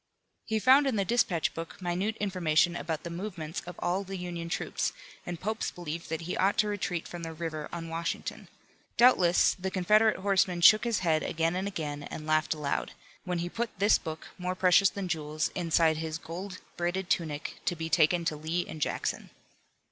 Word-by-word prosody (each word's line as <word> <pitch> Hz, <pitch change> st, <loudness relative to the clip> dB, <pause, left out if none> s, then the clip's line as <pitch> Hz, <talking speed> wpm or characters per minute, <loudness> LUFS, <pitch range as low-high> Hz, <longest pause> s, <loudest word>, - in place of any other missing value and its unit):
He 220 Hz, -, 0 dB
found 265 Hz, +6 st, +6 dB
in 260 Hz, -, +1 dB
the 200 Hz, -2 st, +1 dB
dispatch 180 Hz, -7 st, +1 dB
book 165 Hz, 0 st, -7 dB
minute 185 Hz, +4 st, -1 dB
information 175 Hz, -4 st, +2 dB
about 160 Hz, -1 st, -3 dB
the 170 Hz, -, -5 dB
movements 170 Hz, -3 st, -5 dB
of 180 Hz, -, -7 dB
all 180 Hz, +3 st, -1 dB
the 195 Hz, 0 st, -6 dB
Union 175 Hz, -2 st, -5 dB
troops, -, -, -1 dB, 0.3 s
and 175 Hz, -2 st, -4 dB
Pope's 220 Hz, +4 st, -2 dB
belief 170 Hz, -1 st, -6 dB
that 160 Hz, +1 st, -2 dB
he 170 Hz, +2 st, -3 dB
ought 195 Hz, +2 st, +2 dB
to 215 Hz, -, +3 dB
retreat 195 Hz, -4 st, -2 dB
from 175 Hz, -, -7 dB
the 165 Hz, -1 st, -5 dB
river 155 Hz, -2 st, -4 dB
on 165 Hz, -1 st, -5 dB
Washington. 165 Hz, +1 st, -4 dB, 0.5 s
Doubtless 190 Hz, -8 st, +5 dB
the 190 Hz, +1 st, -4 dB
Confederate 210 Hz, +4 st, +3 dB
horseman 190 Hz, -2 st, +1 dB
shook 215 Hz, +6 st, +7 dB
his 230 Hz, -2 st, 0 dB
head 160 Hz, -3 st, +2 dB
again 165 Hz, +1 st, 0 dB
and 190 Hz, +2 st, -1 dB
again 150 Hz, -7 st, -4 dB
and 155 Hz, +1 st, -7 dB
laughed 155 Hz, 0 st, +2 dB
aloud, 145 Hz, -2 st, -2 dB, 0.3 s
when 180 Hz, -1 st, -1 dB
he -, -, -3 dB
put 230 Hz, +4 st, -4 dB
this 205 Hz, +3 st, +4 dB
book, 160 Hz, -1 st, -7 dB
more 180 Hz, 0 st, -2 dB
precious 185 Hz, +1 st, +5 dB
than 200 Hz, -2 st, -5 dB
jewels, 155 Hz, -2 st, -2 dB
inside 165 Hz, -2 st, +2 dB
his 160 Hz, 0 st, -3 dB
gold 180 Hz, +4 st, -7 dB, 0.2 s
braided 175 Hz, +2 st, -1 dB
tunic, 155 Hz, -4 st, -2 dB
to 175 Hz, -, +1 dB
be 160 Hz, 0 st, -4 dB
taken 165 Hz, +2 st, +3 dB
to 160 Hz, -, 0 dB
Lee 160 Hz, +4 st, -2 dB
and 155 Hz, -, -8 dB
Jackson. -, -, -2 dB
175 Hz, 190 wpm, -29 LUFS, 160-190 Hz, 0.5 s, shook